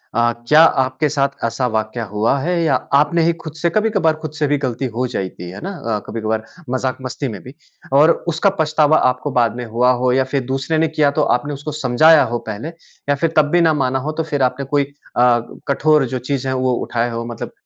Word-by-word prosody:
अ, 120 +1 +3 0.2
क्या 150 +4 +6
आपके 130 -1 +2
साथ 140 -1 +1 0.2
ऐसा 120 +3 -1
वाक़या 110 +1 -2
हुआ 110 +6 +1
है 170 +4 -1
या 150 -5 +2 0.2
आपने 150 +3 +2
ही 170 +1 +2
खुद 160 -2 -7
से 170 - +2
कभी-कभार 200 -5 +1
खुद 155 - -5
से 155 -1 -1
भी 145 +1 +1
गलती 130 -2 -3
हो 125 +2 0
जाती 90 -2 -5
है 95 - -9
ना? 195 - -4
अ, 110 -6 -2
कभी-कभार 110 0 -3 0.3
मजाक-मस्ती 130 +1 -3
में 105 -6 -7
भी 130 - -11 0.4
और 150 +4 +6 0.2
उसका 170 +6 +2
पछतावा 155 0 +3
आपको 125 +3 -3
बाद 120 -3 +1
में 125 0 -5
हुआ 120 +3 +2
हो 125 - +3
या 130 +1 +3
फिर 135 -2 +1
दूसरे 135 +4 -1
ने 160 +1 +2
किया 155 -2 +1
तो - - +4 0.2
आपने 145 +4 -6
उसको 145 +2 -6
समझाया 150 +5 +5
हो 120 - -1
पहले 110 +6 -5 0.4
या 145 - +3
फिर 160 +3 -1
तब 150 -1 +4
भी 175 - +4
ना 165 -2 +4
माना 130 +1 0
हो 145 +4 -3
तो - - -2
फिर 150 -3 -3
आपने 130 +2 -1
कोई 145 +1 +1 0.3
अ, 120 -1 +4 0.3
कठोर 150 +1 +3
जो - - -2
चीज़ 135 -2 -1
है 130 - 0
वो 130 0 +1
उठाए 120 0 -1
हो 115 0 -4
मतलब 120 -1 -6
135 Hz, 225 wpm, -18 LUFS, 120-155 Hz, 0.4 s, क्या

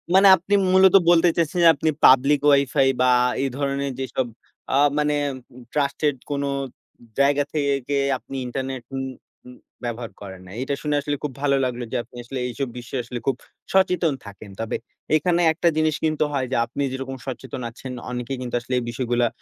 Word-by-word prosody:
মানে 195 +1 +7
আপনি 190 +4 -4 0.2
মূলত 190 0 +6
বলতে 175 0 +5
চাইছেন 170 +1 0
যে, - - +8
আপনি 155 +3 0 0.2
পাবলিক 135 +2 +6
ওয়াইফাই 140 -1 +4
বা 125 - +5 0.3
এই 135 - 0
ধরনের 140 -1 -1
যেসব 130 -1 -2 0.5
আ - - +3 0.2
মানে, 150 0 +2 0.6
ট্রাস্টেড 145 0 0 0.2
কোনো 140 0 -1 0.7
জায়গা 145 +1 +4
থেকে 140 -2 0 0.2
আপনি 135 - -10
ইন্টারনেট 130 0 -4
উম 135 - -2 0.4
উম 125 0 -12 0.3
ব্যবহার 120 -1 -4
করেন 95 -2 -9
না। 90 - -12
এটা 135 +2 -1
শুনে 150 -1 0
আসলে 145 0 -2
খুব 145 - -2
ভালো 140 -1 +2
লাগলো 125 -1 -3
যে, - - -3
আপনি 125 - -21
আসলে 130 +2 -5
এইসব 125 +2 -3
বিষয়ে 125 +1 -4
আসলে 125 0 -6
খুব 135 - +2 0.4
সচেতন 180 -5 +3
থাকেন। 100 0 -11
তবে 115 - -2 0.4
এখানে 175 +2 +2
একটা 170 +2 0
জিনিস 155 -1 +2
কিন্তু 155 -1 +1
হয় 135 -2 0
যে, - - 0
আপনি 135 +4 -5
যেরকম 135 0 -5
সচেতন 130 0 -6
আছেন 125 +2 -9 0.2
অনেকেই 125 +2 -4
কিন্তু 120 -1 -4
আসলে 125 +2 -6
এই - - -5
বিষয়গুলা, 120 0 0
135 Hz, 175 wpm, -23 LUFS, 125-150 Hz, 0.7 s, যে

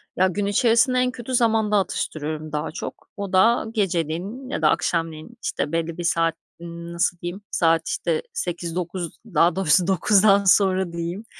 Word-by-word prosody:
Ya, 185 +1 +3
gün 200 +2 -2
içerisinde 235 +5 +3
en 250 0 +1
kötü 250 +1 -7
zamanda 220 -3 +2
atıştırıyorum 155 -4 -3
daha 150 +1 -3
çok. - - -8
O 200 -2 -5
da 225 +5 +4
geceleyin 195 - -2
ya - - -3
da 155 - +4
akşamleyin, 165 +5 -2
işte, 145 - -2
belli 165 0 -2
bir 175 - -4
saat 165 -1 +1 0.2
nasıl 170 +1 -3
diyeyim? 175 +4 -6
Saat, 165 -1 +2
işte, 470 -1 -1
20.00-21.00 175 - -4
daha 180 -6 +2
doğrusu 180 -1 +3
21.00'dan 200 +2 +4
sonra 190 -2 +3
diyeyim, 170 +5 -5
180 Hz, 155 wpm, -23 LUFS, 165-210 Hz, 0.2 s, da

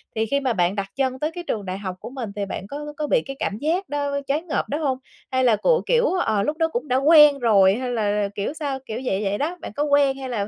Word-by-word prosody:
thì 220 - +1
khi 280 +5 0
mà 260 -4 0
bạn 180 0 +1
đặt 200 -1 -2
chân 260 -1 -1
tới 305 +2 -1
cái 350 +1 -7
trường 205 -3 -2
đại 185 +1 -4
học 190 -2 -5
của - - -8
mình 245 -6 -6
thì 200 -1 -2
bạn 195 0 -6
có 285 - -6 0.2
c - - -34
có 300 -1 -2
bị - - +3
cái 275 0 -6
cảm 200 - -2
giác 340 - -1
đó 285 -1 -1
choáng 305 +5 -1
ngợp - - -1
đó 290 - -1
hông? 275 -5 -1 0.3
Hay 260 0 +1
là 235 -3 +5
của 480 - +2
kiểu, 480 0 +3
ờ, 220 - +1
lúc 300 +6 -2
đó 325 -1 +2
cũng 285 -2 -4
đã 255 - +1
quen 300 0 +7
rồi, 200 -5 +5
hay 250 +1 -3
là 210 -3 0
kiểu 205 +8 -2
sao? 285 -4 -3
Kiểu 225 +2 -5
vậy 195 -2 0
vậy 200 +1 -1
đó, 335 +5 -2
bạn - - -7
có 290 - 0
quen 285 -2 +3
hay 265 -1 -6
là 210 -4 -2
265 Hz, 290 wpm, -23 LUFS, 210-295 Hz, 0.3 s, quen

